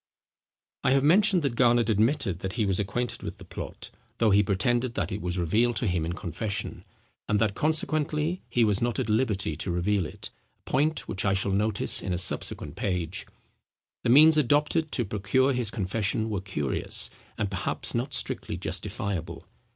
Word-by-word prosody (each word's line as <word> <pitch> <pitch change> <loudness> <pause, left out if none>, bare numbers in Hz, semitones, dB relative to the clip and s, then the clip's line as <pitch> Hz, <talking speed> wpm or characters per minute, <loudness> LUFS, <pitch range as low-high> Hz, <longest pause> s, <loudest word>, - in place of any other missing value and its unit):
I 130 - +4
have 135 0 +3
mentioned 185 +3 +4
that 140 -4 0
Garnet 120 -1 +3
admitted 110 - +1
that 95 +1 -4
he 110 -2 0
was 95 -1 0
acquainted 110 +5 -2
with - - -6
the - - -12
plot, - - -8 0.3
though 115 -2 +3
he 100 +1 +6
pretended 120 +5 0
that - - -2
it 100 +2 -4
was 90 0 -2
revealed 110 +8 +2
to - - -1
him 90 -5 0
in 85 - -2
confession, 95 +3 -4 0.4
and 105 - +3
that 110 -2 +2
consequently 155 - 0
he 120 - +2
was 105 -2 +2
not 120 -1 0
at - - -2
liberty 105 -7 +1
to - - -3
reveal 90 +1 0
it, - - -9 0.3
a - - -44
point 150 +4 +1
which 95 - -3
I 95 -1 +2
shall 100 +1 0
notice 105 +1 +1
in 95 - -2
a - - -1
subsequent 90 - -2
page. 90 -2 -3 0.8
The - - 0
means 155 +5 +7
adopted 150 +3 +2
to 120 - +1
procure 105 +7 +1
his 120 -4 0
confession 110 +2 -1
were 100 -3 -2
curious, 85 -8 -1 0.3
and 100 -2 -2
perhaps 95 - -2
not 125 +3 -1
strictly - - -2
justifiable. 95 -5 -4
110 Hz, 180 wpm, -27 LUFS, 95-130 Hz, 0.8 s, means